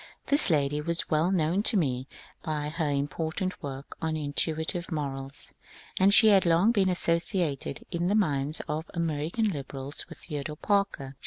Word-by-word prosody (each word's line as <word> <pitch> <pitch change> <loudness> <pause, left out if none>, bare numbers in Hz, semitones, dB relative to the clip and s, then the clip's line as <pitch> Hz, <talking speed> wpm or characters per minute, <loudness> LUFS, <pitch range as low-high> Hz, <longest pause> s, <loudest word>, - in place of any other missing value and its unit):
This 285 -5 +4
lady 145 -2 +1
was 170 +3 -1
well 155 +3 +3
known 175 +1 +2
to 215 0 +3
me 130 -6 0 0.3
by 150 -3 -2
her 160 -1 -1
im 140 0 0
portant 165 +5 -3
work 140 0 -7
on 160 -1 -1
Intuitive 160 +4 -1
Morals," 140 -3 -4 0.5
and 190 +1 +5
she 220 +1 +8
had 195 -2 +6
long 170 +6 +4
been 195 -5 +2
associated 170 -5 0
in 175 -1 -1
the 200 - +2
minds 150 -7 0
of 155 +1 -3
American 165 +6 -1
liberals 140 -3 -5
with - - -10
Theodore 150 -1 -6
Parker. 180 -10 -1
160 Hz, 160 wpm, -28 LUFS, 145-180 Hz, 0.5 s, she